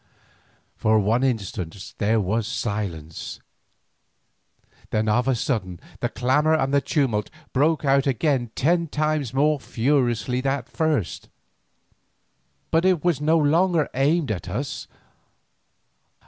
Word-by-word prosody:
For 110 Hz, 0 st, +2 dB
one 110 Hz, +4 st, +2 dB
instant 100 Hz, -7 st, -3 dB
there 110 Hz, +1 st, +2 dB
was 105 Hz, +3 st, -1 dB
silence, 90 Hz, -8 st, -4 dB, 1.5 s
then 110 Hz, 0 st, 0 dB
of 120 Hz, +4 st, +2 dB
a 135 Hz, -, +3 dB
sudden 100 Hz, -, -2 dB, 0.2 s
the -, -, -1 dB
clamour 145 Hz, +7 st, +2 dB
and 135 Hz, -3 st, 0 dB
the 140 Hz, -, +4 dB
tumult 130 Hz, -7 st, 0 dB, 0.2 s
broke 150 Hz, +3 st, +2 dB
out 135 Hz, 0 st, +3 dB
again 130 Hz, -1 st, +1 dB
ten 170 Hz, +5 st, +2 dB
times 150 Hz, -4 st, -1 dB
more 145 Hz, +3 st, +2 dB
furiously 125 Hz, -1 st, 0 dB
than 135 Hz, +1 st, +1 dB
at 125 Hz, -1 st, -11 dB
first. 150 Hz, -, -1 dB, 1.4 s
But 165 Hz, +1 st, +3 dB
it 185 Hz, -4 st, +2 dB
was 175 Hz, -5 st, +1 dB
no 160 Hz, +2 st, +3 dB
longer 165 Hz, +1 st, +2 dB
aimed 145 Hz, +1 st, +1 dB
at 90 Hz, -3 st, -4 dB
us. 130 Hz, +9 st, -4 dB
135 Hz, 120 wpm, -24 LUFS, 110-150 Hz, 1.5 s, the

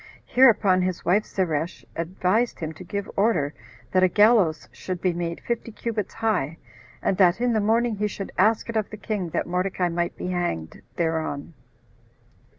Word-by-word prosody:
Hereupon 210 Hz, -7 st, +5 dB
his 180 Hz, -1 st, -2 dB
wife 205 Hz, +5 st, +3 dB
Zeresh 170 Hz, -3 st, -2 dB
advised 185 Hz, +7 st, 0 dB
him 160 Hz, -1 st, -4 dB
to 170 Hz, -, -11 dB
give 200 Hz, +3 st, -4 dB
order 195 Hz, -9 st, +2 dB, 0.4 s
that 185 Hz, -, +3 dB
a 185 Hz, -, +6 dB
gallows 205 Hz, -5 st, +4 dB
should 185 Hz, -1 st, -5 dB
be 180 Hz, 0 st, +1 dB
made 170 Hz, -1 st, -3 dB
fifty 235 Hz, -1 st, -3 dB
cubits 220 Hz, -2 st, -4 dB
high, 210 Hz, -9 st, 0 dB, 0.5 s
and 190 Hz, -, +1 dB
that 180 Hz, +1 st, +4 dB
in 245 Hz, 0 st, +1 dB
the 220 Hz, -, +2 dB
morning 225 Hz, +1 st, +1 dB
he 210 Hz, +1 st, 0 dB
should 195 Hz, -1 st, -6 dB
ask 215 Hz, +4 st, +3 dB
it 230 Hz, -, -5 dB
of 215 Hz, -2 st, 0 dB
the 215 Hz, -, -8 dB
king 205 Hz, -4 st, -3 dB
that -, -, -1 dB
Mordecai 180 Hz, 0 st, -1 dB
might 170 Hz, +1 st, -2 dB
be 180 Hz, -, -4 dB
hanged 175 Hz, -, -3 dB
thereon. 160 Hz, -2 st, -2 dB
185 Hz, 170 wpm, -25 LUFS, 170-215 Hz, 0.5 s, a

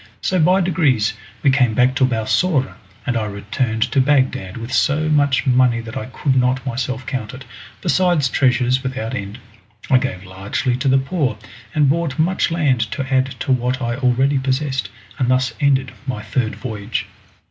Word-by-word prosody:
So 185 Hz, -, 0 dB
by 180 Hz, +4 st, +4 dB
degrees 140 Hz, -, +2 dB, 0.3 s
we 140 Hz, -, +5 dB
came 125 Hz, -5 st, +2 dB
back 125 Hz, +2 st, +3 dB
to 135 Hz, -, +4 dB
Balsora, 130 Hz, +5 st, 0 dB, 0.3 s
and 125 Hz, -, -1 dB
I 110 Hz, -2 st, 0 dB
returned 110 Hz, +3 st, -2 dB
to 135 Hz, -, +3 dB
Bagdad 130 Hz, -9 st, +1 dB
with 115 Hz, +2 st, -6 dB
so 155 Hz, +4 st, +2 dB
much 145 Hz, -3 st, +2 dB
money 125 Hz, -2 st, +3 dB
that 115 Hz, -1 st, -8 dB
I 130 Hz, -1 st, -4 dB
could 130 Hz, +1 st, -1 dB
not 125 Hz, 0 st, +1 dB
myself 130 Hz, +1 st, -3 dB
count 125 Hz, -2 st, -4 dB
it, 130 Hz, 0 st, -11 dB, 0.4 s
besides 175 Hz, -7 st, +2 dB
treasures 125 Hz, 0 st, +2 dB
without 130 Hz, -3 st, -4 dB
end. 100 Hz, -2 st, -5 dB, 0.5 s
I 130 Hz, -, +6 dB
gave 95 Hz, -8 st, -4 dB
largely 95 Hz, +6 st, -2 dB
to 135 Hz, +2 st, -2 dB
the 135 Hz, 0 st, +5 dB
poor, 135 Hz, -, -1 dB, 0.4 s
and 150 Hz, -2 st, +4 dB
bought 155 Hz, -1 st, 0 dB
much 175 Hz, +4 st, +1 dB
land 150 Hz, -7 st, +1 dB
to 135 Hz, 0 st, -3 dB
add 130 Hz, 0 st, +3 dB
to 130 Hz, -, -1 dB
what 125 Hz, +1 st, +1 dB
I 120 Hz, -2 st, -2 dB
already 135 Hz, +1 st, +2 dB
possessed, 130 Hz, -4 st, -1 dB, 0.3 s
and 125 Hz, -2 st, +1 dB
thus 130 Hz, +1 st, +1 dB
ended 135 Hz, -2 st, +2 dB, 0.2 s
my 125 Hz, -5 st, -3 dB
third 120 Hz, -4 st, -1 dB
voyage. 110 Hz, -3 st, -4 dB
130 Hz, 175 wpm, -19 LUFS, 120-140 Hz, 0.5 s, I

